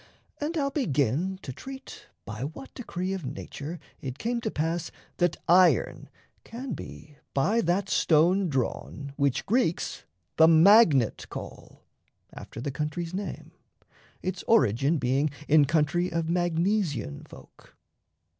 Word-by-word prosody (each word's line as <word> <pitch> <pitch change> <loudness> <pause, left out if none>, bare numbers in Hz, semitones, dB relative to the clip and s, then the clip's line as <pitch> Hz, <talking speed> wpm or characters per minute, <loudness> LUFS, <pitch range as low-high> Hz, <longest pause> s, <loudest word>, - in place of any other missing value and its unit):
And 310 +3 -2
I'll 275 -2 0
begin 155 - 0
to 130 - -6
treat 265 - -10 0.2
by 110 +1 -7
what 155 - -7
decree 185 -6 -4
Of 190 -3 -4
nature 145 +4 -6 0.2
it 130 -1 -5
came 235 +6 -2
to 220 - -2
pass 165 -1 -2 0.3
that 175 -1 +1
iron 180 +2 +4 0.3
can 245 0 -6
be 150 -1 -10 0.2
By 205 +12 +2
that 180 +2 0
stone 175 +3 +3
drawn 140 +1 -3
which 140 -3 0
Greeks 225 -6 0 0.3
the 160 - +7
magnet 165 - +5
call - - -9 0.5
After - - -9
the 135 +4 -3
country's 155 +4 -4
name 200 +2 -5 0.7
(its 185 -1 -3
origin 140 - +3
Being 135 +3 +1 0.2
in 150 -1 +6
country 165 +4 +1
of 165 -1 -1
Magnesian 170 - 0
folk). - - -17
165 Hz, 125 wpm, -27 LUFS, 145-195 Hz, 0.7 s, the